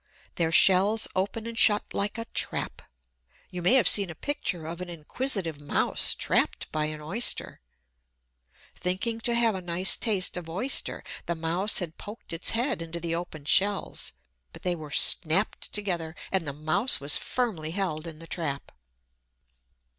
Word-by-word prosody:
Their 165 -2 -1
shells 195 +5 +6
open 205 +4 -2
and 230 0 -7
shut 210 -2 +5
like 205 +3 -2
a 230 - -5
trap. - - -1 0.7
You 180 - -6
may 180 +9 +4
have 240 -9 +4
seen 200 -3 +7
a 160 - -8
picture 180 - -4
of 165 +2 -7
an 180 - -7
inquisitive 170 - -2
mouse 145 - +1
trapped - - -1
by 155 0 -1
an 155 0 -6
Oyster. 195 - -2 1.1
Thinking 200 +6 -3
to 235 +1 0
have 230 -2 +2
a 190 - -6
nice 175 +2 +4
taste 195 -5 0
of 170 -2 -8
Oyster, 200 +12 0 0.2
the 170 - -2
mouse 170 +6 0
had 170 -3 -2
poked 210 -3 -11
its 165 - +1
head 235 -4 -1
into 165 +1 -7
the 165 0 -4
open 165 -4 -6
shells, 200 +5 +1 0.4
but - - -15
they 180 - 0
were 155 -3 -9
snapped 170 +6 +2
together, 175 -6 -4 0.2
and 185 -5 -1
the - - -2
mouse 155 - +1
was 140 +1 +2
firmly 210 -12 -3
held 170 -3 -3
in 160 -2 -9
the 165 - -11
trap. 150 -5 -5
180 Hz, 160 wpm, -26 LUFS, 160-210 Hz, 1.1 s, seen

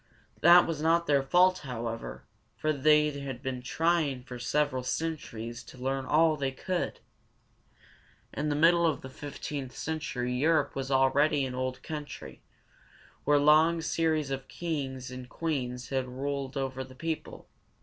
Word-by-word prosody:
That 175 +2 +8
was 160 -3 -3
not 165 +2 +3
their 145 -3 +3
fault, 180 +6 +4
however, 115 - -5 0.3
for 155 0 0
they 150 +1 +4
had 140 -3 -6
been 130 -2 -3
trying 150 -1 0
for 125 -1 -8
several 130 0 0
centuries 125 -6 -4
to - - -13
learn 135 +1 -2
all 160 +1 +4
they 135 -2 -1
could. 180 +6 -3 1.3
In 150 +1 -1
the 145 - 0
middle 170 +2 +5
of 160 - -1
the 130 - -8
fifteenth 140 -3 -6
century 125 -6 -3
Europe 150 +4 +2
was 135 -1 -4
already 140 +2 +3
an 130 - -5
old 130 0 -3
country, 150 -2 -7 0.8
where 145 0 +5
long 155 +3 +5
series 160 -3 0
of 135 -1 -4
kings 135 -6 -4
and 125 -1 -8
queens 130 -7 -3
had 130 -1 -1
ruled 135 +1 -4
over 130 -1 -2
the 130 0 -13
people. 160 +3 -5
140 Hz, 150 wpm, -29 LUFS, 130-155 Hz, 1.3 s, That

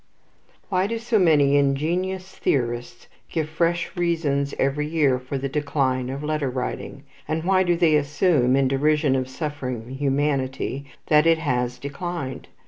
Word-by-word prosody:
Why 185 0 +1
do 230 +2 -2
so 230 -1 +1
many 145 -6 +4
ingenious 175 +7 0
theorists 120 -2 -2 0.2
give 160 -2 -1
fresh 170 +3 -1
reasons 160 -5 0
every 145 +2 0
year 150 -5 +2
for 130 +2 -5
the 135 +1 -2
decline 135 -3 -1
of 135 +2 -5
letter 150 -2 -1
writing, 125 +2 -5 0.2
and 160 +1 -2
why 185 +1 +3
do 175 -2 +2
they 165 -3 +4
assume, 145 -3 +2
in 135 -1 +3
derision 145 +1 +2
of 130 -1 -1
suffering 130 -5 -5
humanity, 135 -1 -1 0.2
that 150 +1 +4
it 165 0 +5
has 125 -5 -1
declined? 140 +1 -5
145 Hz, 145 wpm, -23 LUFS, 135-165 Hz, 0.2 s, it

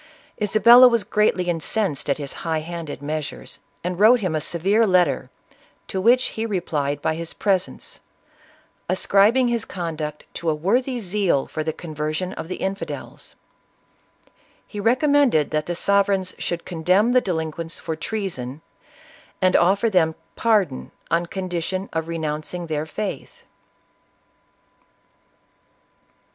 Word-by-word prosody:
Isabella 235 +4 +7
was 235 -3 +2
greatly 210 -3 +1
incensed 175 -2 -1
at 140 - +2
his 145 -2 -5
high 160 -2 -1
handed 165 -3 -7
measures, 155 +1 -5 0.2
and 180 +1 -3
wrote 230 +4 +7
him 185 -6 -1
a 155 - 0
severe 195 +8 +2
letter, 175 -9 +2 0.6
to 190 - -2
which 250 +5 +4
he 220 - -4
replied 150 -9 -2
by - - +1
his 165 +1 -5
presence, 190 -3 -1 0.9
ascribing 205 +7 +3
his 235 -2 0
conduct 155 -6 -5
to 170 - -2
a 155 - +1
wor 195 +11 +2
thy 255 -1 -4
zeal 190 - 0
for 155 - -4
the 160 - -1
conversion 155 +3 -4
of - - -6
the 185 - -4
infidels. 195 +1 -6 1.3
He 210 - -6
recom 255 +7 +2
mended 265 - +3
that 155 0 -1
the 175 - -2
sovereigns 195 0 +1
should 175 -1 -3
condemn 185 +7 +2
the 255 0 +4
delin 160 -6 -2
quents 165 +1 -7
for 160 - -4
treason; 160 - -4 0.8
and 185 -1 +3
offer 195 +6 +4
them 170 -6 +2 0.2
pardon 205 - +1 0.2
on 170 +1 +1
condition 185 +1 -3
of 160 0 -2
renouncing 160 +1 -4
their 155 -1 -3
faith. 205 +5 -6
180 Hz, 135 wpm, -22 LUFS, 160-210 Hz, 1.3 s, Isabella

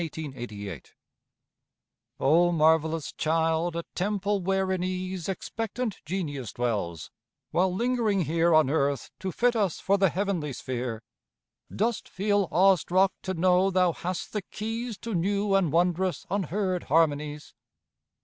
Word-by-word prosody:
_) 120 - -6 1.3
O 170 +5 +4
marvellous 160 -1 +2
child, 165 +1 0
a 170 - -2
temple 200 +1 -1
where 190 +1 0
in 185 -1 -1
ease 185 -1 -3
Expectant 225 +3 -3
Genius 150 - -4
dwells, 105 -10 -2 0.4
while 185 +2 +2
lingering 225 -1 +1
here 165 +2 +2
On 155 -3 +5
earth 140 -2 0
to 190 -1 -3
fit 245 +5 +2
us 200 -7 0
for 200 0 +2
the 195 -1 +4
heavenly 180 -6 -2
sphere, 120 -3 -4 0.7
Dost 225 +2 -1
feel 205 0 +1
awe 190 +2 +5
struck 185 +3 +2
to 190 0 -3
know 180 +2 +3
thou 180 -2 +3
hast 180 +2 -5
the 210 - -1
keys 225 +3 -5
To 230 - -5
new 200 +3 +1
and 190 -6 +3
wondrous 180 +2 +1
unheard 190 -1 -1
harmonies? 150 -1 +1
180 Hz, 130 wpm, -27 LUFS, 155-195 Hz, 1.3 s, On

